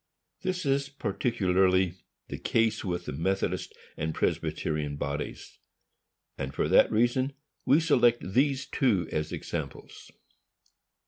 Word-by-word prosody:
This 185 -2 -2
is 135 0 +1
particularly 95 -7 +1 0.3
the - - -6
case 115 -1 +1
with 90 -2 -3
the - - -4
Methodist 95 +7 -1 0.2
and 80 0 -3
Presbyterian 75 -2 -1
bodies, 70 +1 -5 0.8
and 65 0 -4
for - - +1
that - - +6
reason 120 +4 +2 0.3
we 145 - +6
select 120 - +3
these 135 +1 +2
two 105 - +1
as 75 0 -2
examples. - - -6
100 Hz, 115 wpm, -28 LUFS, 85-130 Hz, 0.8 s, that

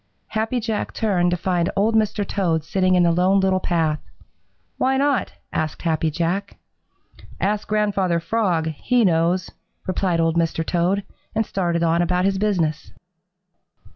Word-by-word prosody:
Happy 220 +3 -1
Jack 220 -2 -3
turned 185 -5 +1
to 175 - 0
find 175 0 0
Old 215 +3 +2
Mr. 215 -2 +1
Toad 165 -6 0
sitting 185 +3 +1
in 180 - +4
the 170 - +4
Lone 185 +3 +3
Little 190 -1 +2
Path. 160 -4 0 0.8
"Why 265 +1 +2
not?" 280 -1 +1 0.2
asked 155 -1 -2
Happy 160 -1 +1
Jack. 175 +6 -2 0.8
"Ask 210 +2 -1
Grandfather 200 -5 +1
Frog; 170 -4 0
he 235 - +1
knows," 175 +1 +1 0.3
replied 185 -2 0
Old 165 0 +1
Mr. 165 -1 0
Toad, 180 +4 0 0.3
and 220 - +1
started 170 -4 -1
on 170 +1 +2
about 180 +1 +1
his 195 -1 +1
business. 170 -7 -1
185 Hz, 145 wpm, -22 LUFS, 170-205 Hz, 0.8 s, in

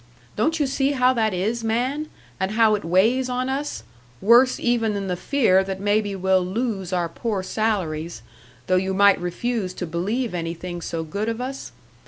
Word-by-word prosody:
Don't 320 +10 +1
you 295 - +2
see 275 +1 0
how 255 -1 +3
that 220 -3 +1
is, 215 +6 -1
man? 255 +7 -1 0.3
And 190 +2 -1
how 220 -1 +4
it 210 - -1
weighs 225 +10 +2
on 250 +1 -1
us, 280 +2 -3 0.4
worse 240 +5 +5
even 225 -3 +1
then 200 -1 -3
the 180 - -1
fear 190 -3 +2
that 190 0 -5
maybe 205 0 0
we'll 190 0 +2
lose 195 -1 -3
our 175 -2 0
poor 200 +3 -3
salaries 170 - -2 0.4
though 185 - +2
you 190 +1 -1
might 200 -1 +5
refuse 185 +2 -2
to 180 - -4
believe 200 +8 -2
anything 175 +1 -4
so 165 0 -3
good 200 +8 -3
of 230 0 -3
us? 265 +2 -5
210 Hz, 180 wpm, -23 LUFS, 185-245 Hz, 0.4 s, worse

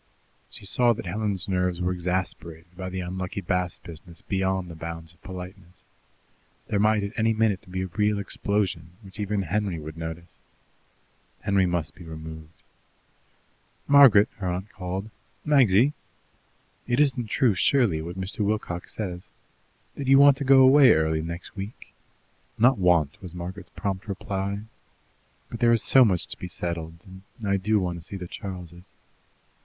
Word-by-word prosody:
She - - -10
saw 120 +4 +3
that 115 -1 -7
Helen's 100 +1 -1
nerves 90 -2 0
were 90 0 0
exasperated 90 -2 -4
by 95 0 -5
the 95 0 -4
unlucky 95 +2 -4
Bast 90 -1 -2
business 85 0 -11
beyond 95 -1 -1
the 85 - -9
bounds 80 0 -7
of 85 - -30
politeness. 90 -1 -10 0.9
There 100 - +1
might 105 0 +3
at 100 - -3
any 110 0 +2
minute 110 -4 0
be 95 0 -3
a - - -2
real 105 +3 0
explosion, 95 -4 -2
which 95 +2 -12
even 105 -1 -1
Henry 95 0 -1
would 80 +1 -8
notice. 80 +1 -7 1.1
Henry 100 -2 +2
must 85 -3 -2
be 90 - -13
removed. 80 0 -10 1.2
"Margaret!" 135 -8 +7
her 100 -3 -4
aunt 90 +3 -3
called. 95 +2 -5 0.3
"Magsy! 135 -3 +4 0.9
It 120 +2 +1
isn't 135 -5 +2
true, 115 +1 +2
surely, 100 - +2
what 85 +3 -7
Mr. 95 +3 -2
Wilcox 100 -4 -2
says, 90 -4 -5 0.6
that 140 - -6
you 135 0 +7
want 140 0 +7
to 140 - -3
go 135 0 +6
away 130 -1 +7
early 80 0 +1
next 85 +5 -7
week?" 100 +3 -8 0.6
"Not 120 +1 +4
'want,'" 85 -5 +2
was 90 -2 -7
Margaret's 90 +3 -7
prompt 100 0 -3
reply; 100 0 -3 0.9
"but 115 - -6
there 120 -1 +4
is 115 - +3
so 130 - +7
much 95 -7 +2
to - - -6
be 90 - -5
settled, 85 -1 -5 0.3
and 110 -4 -6
I 100 0 +2
do 105 +3 +1
want 90 -2 -3
to - - -13
see 95 +4 -7
the 90 -2 -7
Charles'." 90 -2 -8
95 Hz, 160 wpm, -25 LUFS, 85-105 Hz, 1.2 s, Margaret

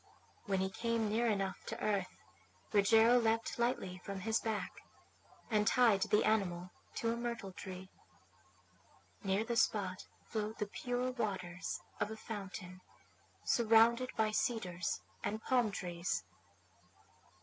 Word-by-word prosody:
When 195 -1 +1
he 190 0 0
came 230 0 0
near 235 +2 +2
enough 195 -3 -1
to - - -4
earth 200 -3 +1 0.7
Rogero 225 +4 +6
leapt 225 0 0
lightly 195 -7 0
from 195 -1 -5
his 220 +3 +1
back, 210 -5 -3 0.7
and 210 -1 +3
tied 230 -5 +5
the 210 +2 +3
animal 180 -4 +1 0.2
to 230 0 0
a - - -2
myrtle 235 -4 -4
tree. 185 0 -8 1.3
Near 195 +2 +1
the 235 +1 -2
spot 190 -5 +1 0.2
flowed 215 0 -3
the 210 - -1
pure 245 +4 -2
waters 190 -7 -3 0.2
of 205 - 0
a 220 - -6
fountain, 195 -4 -7 0.6
surrounded 235 +2 +5
by 220 -1 +3
cedars 185 -7 -1 0.2
and 210 +2 -1
palm 245 -4 +3
trees. 175 -3 -2
215 Hz, 125 wpm, -35 LUFS, 190-230 Hz, 1.3 s, Rogero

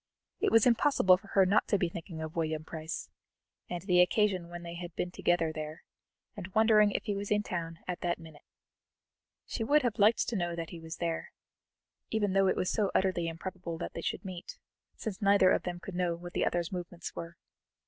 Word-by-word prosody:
It - - +2
was 225 -1 +6
impossible 235 -6 +5
for 200 - -17
her 195 -1 +4
not 200 +3 +3
to 205 - +3
be 180 - +1
thinking 165 -1 -7
of 160 0 -6
William 155 -2 -1
Price, 160 0 -5 0.6
and 175 -1 -4
the 180 -2 +5
occasion 185 -2 +2
when 175 0 -7
they 170 0 -6
had 175 0 -7
been 175 - -2
together 175 -2 +1
there, 155 0 -6 0.5
and 185 - -7
wondering 215 -1 +6
if - - -2
he 205 - -1
was 200 0 -4
in 210 0 +2
town 165 -4 -4
at 180 -1 -3
that 175 -1 0
minute. 160 -3 -13 1.0
She 225 - -3
would 290 +6 +4
have 240 -4 -1
liked 215 +3 +4
to 235 - -2
know 175 -3 -1
that 165 -1 -5
he 170 - -7
was, 160 0 -7 1.1
even 205 -3 0
though 195 0 +4
it - - +2
was 180 - 0
so 205 -3 +1
utterly 185 -3 +2
improbable 170 0 -5
that - - -5
they 165 - -5
should 195 - -3
meet, 180 -2 -7 0.4
since 215 -4 -5
neither 200 -2 +5
of - - +3
them 175 -1 -4
could 195 - -8
know 175 -1 0
what 175 +1 -9
the - - +1
other's 175 -1 -1
movements 175 -1 -6
were. 170 0 -7
180 Hz, 210 wpm, -31 LUFS, 170-200 Hz, 1.1 s, was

